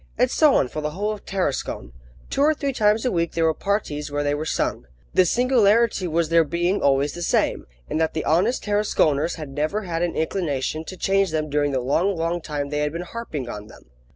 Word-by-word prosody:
And 250 +1 +2
so 305 -3 +4
on 130 - +3
for 155 - -5
the 150 - -2
whole 210 +2 0
of 210 - -7
Tarascon. 145 - -2 0.4
Two - - 0
or 305 +2 +4
three 280 -2 -2
times 215 0 +2
a 250 - +2
week 170 -1 -1
there 165 -1 +1
were 160 - +3
parties 155 -7 -2
where 145 0 -1
they 145 0 +1
were 155 +2 -3
sung. - - -2 0.3
The 185 - +5
singularity 230 -4 +3
was 165 -1 0
their 165 0 +5
being 175 +5 0
always 140 +1 +2
the 175 - -7
same, - - 0 0.2
and 155 - -1
that 160 - 0
the 155 - -2
honest 185 - +2
Tarasconers 175 -7 +1
had 155 -4 -7
never 155 +10 -2
had 170 -3 -3
an 175 -1 -1
inclination 160 -2 -2
to 185 - -8
change 195 0 +2
them 155 -2 -2
during 145 0 +1
the 130 -2 0
long, 170 +10 +1
long 165 +1 -1
time 145 -3 -4
they 150 0 -2
had 150 0 0
been 170 +1 -4
harping 175 - -6
on 105 -3 -7
them. 65 - -17
165 Hz, 225 wpm, -23 LUFS, 150-200 Hz, 0.4 s, The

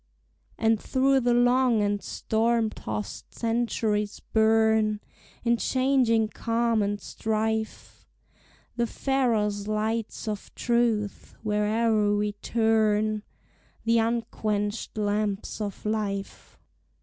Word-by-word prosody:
And 225 -1 +2
through 270 +1 +2
the 245 -1 +2
long 245 -2 +3
and 205 0 0
storm 225 0 0
tost 105 - -6
centuries 225 -3 -1
burn 220 -1 +2 0.4
In 235 0 +3
changing 255 -4 +2
calm 230 0 0
and 205 0 -1
strife 220 +2 -3 0.7
The 235 0 +1
Pharos 220 -7 0
lights 215 +1 -2
of 210 -1 -4
truth, 235 -4 0
where'er 210 0 +2
we 210 0 0
turn, 215 0 +1 0.6
The 230 0 +3
unquenched 220 -2 -2
lamps 210 0 -1
of 205 -1 -5
life. 205 -2 -3
220 Hz, 95 wpm, -26 LUFS, 210-230 Hz, 0.7 s, long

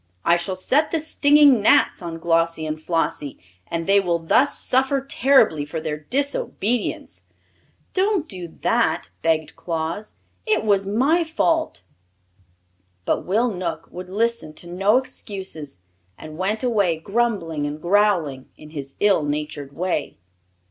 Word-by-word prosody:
I 170 - +5
shall 185 +2 -2
set 275 +11 +1
the 330 - 0
stinging 290 -5 +5
gnats 205 - +4
on 170 -2 -5
Glossie 165 -1 +1
and 155 0 -4
Flossie, 160 -4 -2 0.3
and 165 0 -3
they 200 +2 +5
will 175 -3 0
thus 170 - +2
suffer 265 +2 +1
terribly 260 - +3
for 145 +3 -5
their 155 -1 -3
disobedience." 245 - -2 0.7
"Don't 380 -3 +1
do 180 -4 -4
that!" 160 - 0
begged 160 -1 0
Claus. 165 +5 -4 0.3
"It 435 - +2
was 200 -2 +2
my 275 - +2
fault." 320 0 0 1.2
But - - -1
Will 225 +6 +2
Knook 180 -4 -4
would 180 0 -8
listen 225 -5 -1
to 175 - -10
no 195 +6 +2
excuses, 190 - -6 0.4
and 155 0 -10
went 200 +7 -1
away 205 -9 +2
grumbling 175 -6 -1
and 150 +1 -5
growling 175 -7 +1
in 150 0 -13
his 140 -3 -7
ill 205 -5 +4
natured 145 -1 -4
way. 180 +6 -3
185 Hz, 135 wpm, -22 LUFS, 160-240 Hz, 1.2 s, I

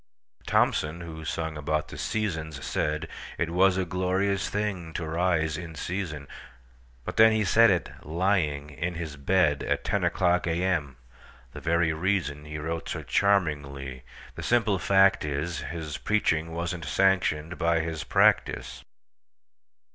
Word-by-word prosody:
Thomson, 80 +3 +1
who 80 -2 -8
sung 80 0 -3
about 75 +1 -1
the - - -8
"Seasons," 80 -9 -2
saidIt 75 +3 -1 0.4
was 95 +2 +3
a 95 - 0
glorious 95 +2 0
thing 100 -6 -3
to 85 - -3
rise 80 -1 0
in 85 -2 -8
season; 80 -6 -4 0.8
But - - -5
then 110 0 +7
he 110 -1 +2
said 115 +4 +6
it—lying—in 85 -3 -1
his 80 -3 -5
bed, 75 0 +2
At - - -1
ten - - 0
o'clock 90 -1 +2
A.M.,—the 70 -8 -4
very 85 0 +2
reasonHe 75 -4 -2
wrote 80 +2 -4
so - - -4
charmingly. 70 -9 0 0.3
The - - -7
simple 115 -5 +2
fact 95 +1 +4
is, 75 +2 -2
His 80 -2 -5
preaching 85 -6 +1
was 85 +2 -2
n't 85 -3 -7
sanctioned 90 -1 +1
by 85 -1 +2
his 80 -1 -4
practice. 65 -4 +2
85 Hz, 130 wpm, -27 LUFS, 75-95 Hz, 0.8 s, then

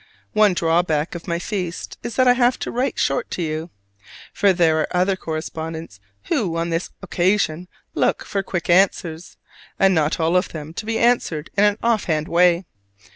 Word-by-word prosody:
One 210 -3 +4
drawback 165 -2 +1
of 170 0 -8
my 170 -1 0
feast 180 -2 -5
is 235 - -6
that 255 -1 +3
I 250 - +7
have 250 0 +2
to - - -3
write 255 +3 -1
short 245 - 0
to 175 - -3
you; 160 +1 -3 0.6
for 200 - +3
there 165 -3 +3
are 155 - 0
other 185 +2 +2
correspondents 160 - -6 0.2
who 175 -6 -1
on 170 0 -1
this 165 +2 -2
occasion 180 -2 0 0.3
look - - 0
for 200 - -2
quick 180 -3 -4
answers, 175 -2 +1 0.4
and 195 0 +4
not 155 -1 +1
all 165 +2 +1
of 180 - +2
them 155 0 -8
to 215 +5 -6
be 225 0 0
answered 230 -11 +1
in 205 +1 +4
an 205 0 +2
offhand 180 -10 +1
way. 175 +1 +3
175 Hz, 180 wpm, -21 LUFS, 160-200 Hz, 0.6 s, I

